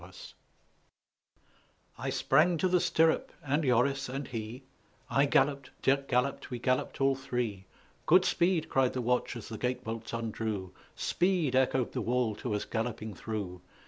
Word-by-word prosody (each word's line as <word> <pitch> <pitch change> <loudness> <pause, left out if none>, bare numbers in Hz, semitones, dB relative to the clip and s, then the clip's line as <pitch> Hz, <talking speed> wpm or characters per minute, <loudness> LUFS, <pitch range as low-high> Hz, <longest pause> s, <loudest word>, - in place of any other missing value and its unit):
jpg} - - -12 1.7
I - - -2
sprang 170 +2 +3
to 185 - +2
the 180 0 +3
stirrup, 160 -1 +2
and 145 +2 0
Joris 135 +1 +2
and 135 +2 -4
he: 115 +2 -6 0.5
I 140 +1 +4
galloped, 140 0 +2
Dirck 140 +1 +2
galloped, 125 +2 0
we 125 - -4
galloped 130 +2 -1
all 135 0 +4
three; 125 -7 -3 0.4
"Good 180 +3 +6
speed!" 170 -3 +2
cried 130 -1 +2
the 130 - -2
watch 125 +1 0
as 115 -3 -7
the 110 -2 -7
gate 125 0 -1
bolts 115 0 -5
undrew, 110 -5 -3 0.2
"Speed!" 175 -7 +1
echoed 130 -1 +2
the - - -2
wall 120 -2 +1
to 110 -3 -2
us 105 - -2
galloping 110 -2 -3
through. 95 -3 -5
125 Hz, 155 wpm, -30 LUFS, 115-140 Hz, 1.7 s, Good